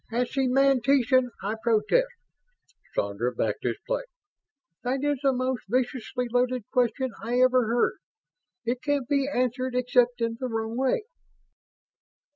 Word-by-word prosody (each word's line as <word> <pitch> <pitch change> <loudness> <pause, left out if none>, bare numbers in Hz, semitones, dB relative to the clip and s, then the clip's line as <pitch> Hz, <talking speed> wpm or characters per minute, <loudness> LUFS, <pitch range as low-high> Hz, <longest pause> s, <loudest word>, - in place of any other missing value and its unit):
"As 240 +1 0
semantician, 265 -1 +3
I 210 +3 -2
protest!" 230 - +2 0.9
Sandra 100 +5 -1
backed 105 -2 -1
his 120 -2 0
play. - - -1 0.8
"That 260 +2 -1
is 290 -2 +1
the 275 -2 +3
most 255 -1 -2
viciously 250 0 -1
loaded 250 0 +1
question 250 +1 +1
I 240 +2 -1
ever 255 -2 +4
heard 235 +2 +1 0.7
it 240 +2 -1
can't 285 -4 0
be 275 -1 +1
answered 255 0 -1
except 250 -1 +2
in 230 0 -1
the 255 - -2
wrong 225 -1 -3
way!" 265 - +1
250 Hz, 130 wpm, -26 LUFS, 235-260 Hz, 0.9 s, ever